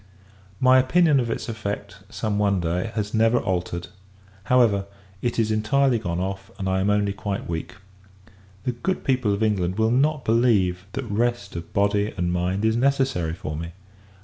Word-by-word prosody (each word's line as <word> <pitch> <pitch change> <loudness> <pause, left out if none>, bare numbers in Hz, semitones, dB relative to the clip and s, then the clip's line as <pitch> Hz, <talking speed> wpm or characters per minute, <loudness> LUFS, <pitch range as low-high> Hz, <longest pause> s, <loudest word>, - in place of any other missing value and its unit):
My 130 0 +6
opinion 150 +2 +4
of 120 -2 -1
its - - -3
effect, 100 -3 -5
some 105 -3 -2
one 100 -2 +2
day, 90 +5 -1
has 105 -2 -2
never 115 +2 +3
altered. 90 -4 -2 0.6
However, 110 -5 +3 0.3
it 120 -1 -1
is 110 -1 +1
entirely 120 +3 +2
gone 85 -5 -3
off, 95 +1 -4
and 95 - -3
I 95 0 +1
am 95 +2 +1
only 105 -1 +1
quite 100 -1 -4
weak. 80 -1 -4 0.9
The 125 - 0
good 125 +11 -3
people 130 -6 +1
of 100 +2 0
England 95 -4 0
will 110 0 +2
not 145 +3 +1
believe, 100 -6 +2
that 135 -1 -3
rest 115 -2 -1
of 85 0 -7
body 100 +1 +1
and 85 0 0
mind 90 +4 0
is 110 0 +2
necessary 130 -10 +1
for 75 -3 -5
me! 85 +2 -6
105 Hz, 175 wpm, -24 LUFS, 95-120 Hz, 0.9 s, My